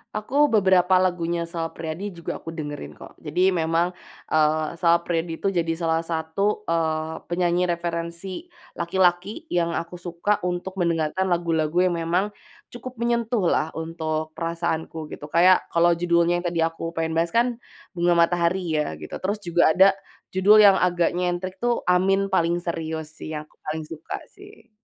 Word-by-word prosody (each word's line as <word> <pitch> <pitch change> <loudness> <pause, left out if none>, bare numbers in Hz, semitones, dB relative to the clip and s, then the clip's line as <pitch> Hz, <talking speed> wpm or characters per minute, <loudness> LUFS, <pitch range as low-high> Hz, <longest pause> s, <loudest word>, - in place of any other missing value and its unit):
Aku 280 +8 +2
beberapa 190 -3 +4
lagunya 170 -2 0
Sal 165 -1 -4
Priadi 165 +5 -5
juga 170 -3 -6
aku 165 - -8
dengerin, 150 -3 -6
kok. - - -12
Jadi 180 +5 +1
memang, 165 +1 +1 0.4
eee, 155 0 +2
Sal 170 0 +2
Priadi 165 -1 -2
itu 195 0 -1
jadi 170 -2 0
salah 165 -1 0
satu, 165 +6 -2
eee, 160 -1 -1
penyanyi 175 0 +1
referensi 170 - -4 0.2
laki-laki 180 - 0
yang 170 -1 +2
aku 175 +1 -6
suka 175 +4 -1
untuk 180 +1 -3
mendengarkan 170 +2 0
lagu-lagu 165 -2 0
yang 180 - +1
memang 180 +5 0 0.4
cukup 245 0 -8
menyentuhlah 235 -8 +1
untuk 160 -1 -3
perasaanku, 165 -1 -3
gitu. 150 - -9
Kayak 180 +3 +4
kalau 170 0 +4
judulnya 170 0 +2
yang - - -12
tadi 170 -1 -3
aku 165 0 -4
pengen 165 -1 -2
bahas 165 +1 +1
kan 240 +3 +1 0.3
Bunga 175 -1 +2
Matahari, 175 +2 +2 0.2
ya, 80 - -4
gitu. 75 - -10
Terus 200 +3 -1
juga 170 -1 +3
ada 190 +1 +7 0.4
judul 200 +3 +6
yang 205 -2 +8
agak 175 -2 +2
nyentrik 180 +2 -2
tuh 240 0 0
Amin 195 +2 +2
Paling 170 -1 +2
Serius, 160 -2 -4
sih. - - -8
Yang 150 0 -10
paling 155 0 -4
suka, 160 0 -6
sih. 400 - -17
170 Hz, 155 wpm, -24 LUFS, 165-185 Hz, 0.4 s, yang